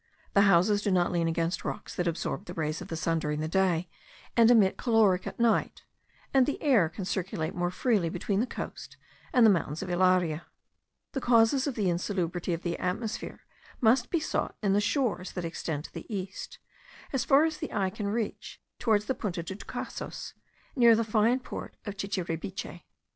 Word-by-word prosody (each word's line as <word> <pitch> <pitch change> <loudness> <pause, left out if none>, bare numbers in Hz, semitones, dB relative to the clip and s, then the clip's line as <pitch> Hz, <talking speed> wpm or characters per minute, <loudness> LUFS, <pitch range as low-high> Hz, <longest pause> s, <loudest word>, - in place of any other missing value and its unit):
The 200 - +5
houses 195 +3 +4
do 205 - 0
not 180 -2 +2
lean 170 -2 +1
against 165 +1 -1
rocks - - -5
that 180 - -1
absorb 170 +3 -2
the 175 - -8
rays 155 -1 -2
of - - -7
the 165 - -4
sun 165 0 0
during 150 -1 -2
the 155 - -2
day, 180 -1 +1 0.5
and 230 -1 +6
emit 215 -6 +5
caloric 220 -6 +3
at - - -7
night, 230 -1 +1 0.5
and 265 -2 +5
the 290 - -2
air 235 - +3
can 190 +3 -6
circulate 180 -4 -2
more 175 0 -1
freely 195 -3 +1
between 195 +4 -1
the 240 - +1
coast - - -7 0.3
and 250 -4 +5
the 220 - +8
mountains 165 -2 -1
of 185 - -5
Ilaria. 175 -3 +2 0.6
The 270 - -3
causes 240 +3 +4
of 275 - -2
the 205 -4 0
insalubrity 175 0 -1
of 165 0 -2
the 170 -1 -2
atmosphere 210 +5 -3 0.4
must 240 +1 +3
be 340 - +1
sought 315 - -2
in 195 -2 +3
the 205 - +3
shores 210 -5 -1
that 180 -2 -4
extend 160 -2 -4
to - - -12
the - - -9
east, 190 -1 -5 0.6
as 270 - +1
far 280 +2 +5
as 315 -1 -2
the 315 - -5
eye 190 -2 0
can 210 0 -4
reach, 215 +1 -3 0.2
towards 210 -3 +2
the 265 - 0
Punta 185 -8 -4
de 190 +3 -6
Tucasos, - - -6 0.4
near 235 -3 +7
the 230 - +1
fine 225 +3 +2
port - - -8
of 205 -2 -5
Chichiribiche. 185 -3 -4
195 Hz, 190 wpm, -29 LUFS, 175-225 Hz, 0.6 s, the